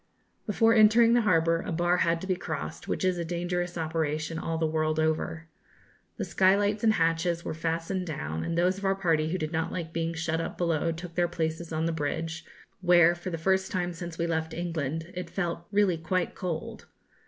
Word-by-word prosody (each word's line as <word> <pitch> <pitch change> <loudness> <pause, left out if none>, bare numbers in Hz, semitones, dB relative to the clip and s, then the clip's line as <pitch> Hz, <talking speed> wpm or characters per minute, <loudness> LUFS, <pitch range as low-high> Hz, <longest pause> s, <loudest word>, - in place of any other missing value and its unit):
Before 225 +2 +4
entering 225 +1 +6
the 240 - +5
harbour, 165 -5 +3
a 195 - -5
bar 175 +1 +2
had 165 -1 +1
to - - -5
be 190 -1 +1
crossed, 75 - -5
which - - -1
is 180 -1 +1
a - - -1
dangerous 175 +1 -2
operation 160 0 -2
all 165 0 -2
the 160 - +1
world 155 0 0
over. 160 +1 -1 0.7
The - - -2
skylights 205 +3 +2
and 220 -1 +5
hatches 165 0 +1
were - - -2
fastened 165 +3 -2
down, 80 - -4
and 170 - -2
those 180 +2 +2
of - - -11
our 195 0 +2
party 165 -5 +1
who 185 - -1
did 155 -2 -3
not 160 -1 -1
like 165 -2 -5
being 165 0 -1
shut 165 0 -1
up - - -5
below 165 -1 +1
took 170 +1 -7
their 175 0 +2
places 165 -1 -3
on 160 0 -1
the 165 - +1
bridge, 160 +2 -3 0.4
where, 175 -2 +6
for 175 +1 -6
the 165 - -3
first 190 +3 +1
time 180 -1 -1
since 170 0 -7
we 170 - 0
left 160 -1 -2
England, 165 -1 -3
it 180 -1 -5
felt 170 -2 -3
really 200 -5 +2
quite 175 +2 -1
cold. 170 -4 -5
170 Hz, 205 wpm, -28 LUFS, 160-180 Hz, 0.7 s, entering